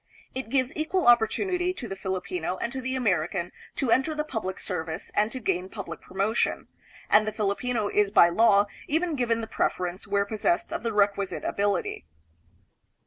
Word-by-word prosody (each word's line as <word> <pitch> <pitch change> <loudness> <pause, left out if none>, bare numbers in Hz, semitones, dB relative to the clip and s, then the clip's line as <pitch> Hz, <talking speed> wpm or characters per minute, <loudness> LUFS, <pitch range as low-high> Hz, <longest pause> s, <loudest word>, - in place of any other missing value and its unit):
It 260 -3 -5
gives 260 0 +1
equal 330 +4 0
opportunity 355 - +3
to 255 -10 -6
the 195 - -5
Filipino 185 -2 -3
and 235 - -3
to 265 - -4
the 260 +1 -2
American 180 -6 0 0.2
to 265 -5 0
enter 285 +6 +2
the 300 - 0
public 220 -10 -4
service 160 -1 -4
and 210 +2 +2
to 260 - -4
gain 190 -4 -1
public 200 -1 -7
promotion; 195 +4 -1 0.4
and 215 +1 +5
the - - 0
Filipino 215 +2 -1
is 205 0 +2
by 200 -4 +7
law 205 +1 +5 0.2
even 330 +3 0
given 235 -4 0
the - - -3
preference 180 -3 -2
where 200 0 +1
possessed 200 -4 0
of - - -2
the 230 - -1
requisite 200 -2 +1
ability. 200 - -1
215 Hz, 170 wpm, -27 LUFS, 190-255 Hz, 0.4 s, by